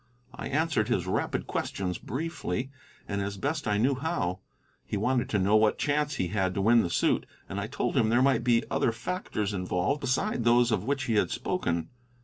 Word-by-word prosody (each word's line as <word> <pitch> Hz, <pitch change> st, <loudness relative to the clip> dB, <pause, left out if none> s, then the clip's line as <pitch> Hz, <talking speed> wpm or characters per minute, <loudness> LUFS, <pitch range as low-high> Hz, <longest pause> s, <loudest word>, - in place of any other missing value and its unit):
I -, -, -6 dB
answered 145 Hz, -7 st, +1 dB
his 90 Hz, -, 0 dB
rapid 95 Hz, -, -1 dB
questions 90 Hz, -2 st, -3 dB
briefly, 140 Hz, -, -3 dB, 0.4 s
and 100 Hz, -1 st, -2 dB
as 100 Hz, 0 st, -3 dB
best 145 Hz, +5 st, -2 dB
I 105 Hz, -1 st, +2 dB
knew 130 Hz, +6 st, +3 dB
how. 130 Hz, -, -2 dB, 0.4 s
He -, -, -3 dB
wanted 125 Hz, +4 st, +1 dB
to 105 Hz, -, +1 dB
know 100 Hz, +2 st, +3 dB
what 110 Hz, 0 st, +4 dB
chance 145 Hz, 0 st, 0 dB
he 90 Hz, -9 st, -1 dB
had 95 Hz, -1 st, 0 dB
to 100 Hz, -, 0 dB
win 115 Hz, +3 st, +5 dB
the 85 Hz, -, -1 dB
suit, 85 Hz, -, +1 dB, 0.2 s
and 100 Hz, -, -4 dB
I 100 Hz, -, -3 dB
told 140 Hz, -, -2 dB
him 115 Hz, -5 st, +3 dB
there 120 Hz, +3 st, +4 dB
might 135 Hz, -3 st, +3 dB
be 120 Hz, -1 st, +3 dB
other 115 Hz, -, +2 dB
factors 115 Hz, -, -3 dB
involved 90 Hz, +8 st, -1 dB
beside 135 Hz, -, 0 dB
those 120 Hz, +1 st, +4 dB
of 105 Hz, -2 st, 0 dB
which 140 Hz, 0 st, 0 dB
he 115 Hz, -4 st, +1 dB
had -, -, +2 dB
spoken. 85 Hz, -1 st, -2 dB
115 Hz, 200 wpm, -28 LUFS, 100-135 Hz, 0.4 s, win